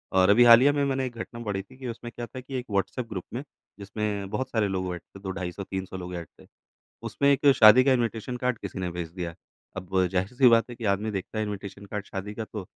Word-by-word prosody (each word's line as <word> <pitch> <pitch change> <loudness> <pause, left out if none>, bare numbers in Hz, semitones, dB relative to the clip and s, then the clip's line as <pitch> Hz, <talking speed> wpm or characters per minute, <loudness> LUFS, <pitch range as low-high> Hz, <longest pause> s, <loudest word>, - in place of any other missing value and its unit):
और 95 0 +5
अभी 110 +4 +7
हालिया 120 +4 +8
में 145 -1 +1
मैंने 135 -1 0
एक 125 -2 -6
घटना 115 +1 -7
पढ़ी 100 -3 -2
थी, 130 +6 -18
कि 130 -1 -7
उसमें 120 0 -6
क्या 120 - -5
था 130 - -9
कि 130 +1 -8
एक 125 - -8
व्हाट्सऐप 115 +5 -1
ग्रुप 95 -4 -5
में 125 - -4 0.4
जिसमें 100 0 -3
बहुत 130 +5 -3
सारे 110 -3 +1
लोग 95 -2 -2
ऐड 85 - -9
थे 100 - -15
2-250 95 -1 -5
300 95 0 -5
लोग 90 0 -6
ऐड 85 -1 -6
थे - - -17 0.6
उसमें 140 - +2
एक 140 +1 0
शादी 110 +4 +8
का 135 - +4
इनविटेशन 120 0 -1
कार्ड 125 -2 -1
किसी - - -7
ने 90 -1 -2
भेज 85 -1 -5
दिया। 85 -2 -5 0.4
अब 95 0 0
ज़ाहिर 95 0 0
सी 130 -2 +7
बात 115 +1 +4
है 120 - -8
कि 115 - -8
आदमी 110 +2 -3
देखता 100 +2 -5
है 110 - 0
इनविटेशन 100 -1 -7
कार्ड 105 0 -5
शादी 100 +2 -6
का 110 - -4
तो 105 -2 -7
105 Hz, 250 wpm, -26 LUFS, 95-120 Hz, 0.6 s, हालिया